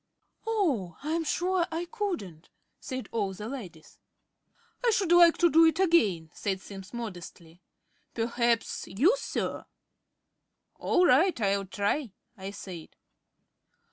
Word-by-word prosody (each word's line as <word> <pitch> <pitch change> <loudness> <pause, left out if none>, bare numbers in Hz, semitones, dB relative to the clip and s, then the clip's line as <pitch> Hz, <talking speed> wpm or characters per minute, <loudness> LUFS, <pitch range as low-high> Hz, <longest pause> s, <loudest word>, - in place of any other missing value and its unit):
"Oh, 280 - 0
I'm 325 +2 -1
sure 355 +2 0
I 330 +2 -3
couldn't," 340 - -5 0.3
said 260 -1 -6
all 205 -4 -1
the 210 +3 -7
ladies. 190 - -9 0.8
"I 485 - +4
should 390 -6 +1
like 345 -1 +7
to 345 - +5
do 325 +1 +6
it 320 +1 +2
again," 210 - +2
said 195 -2 -2
Simms 195 0 -11
modestly. 180 -6 -8 0.5
"Perhaps 235 0 0
you, 295 - +3
Sir?" - - -3 1.2
"All 360 - +3
right, 355 -3 +4
I'll 200 -2 0
try," 205 +5 -1 0.2
I 190 -2 -7
said. 185 -5 -9
235 Hz, 120 wpm, -28 LUFS, -, 1.2 s, like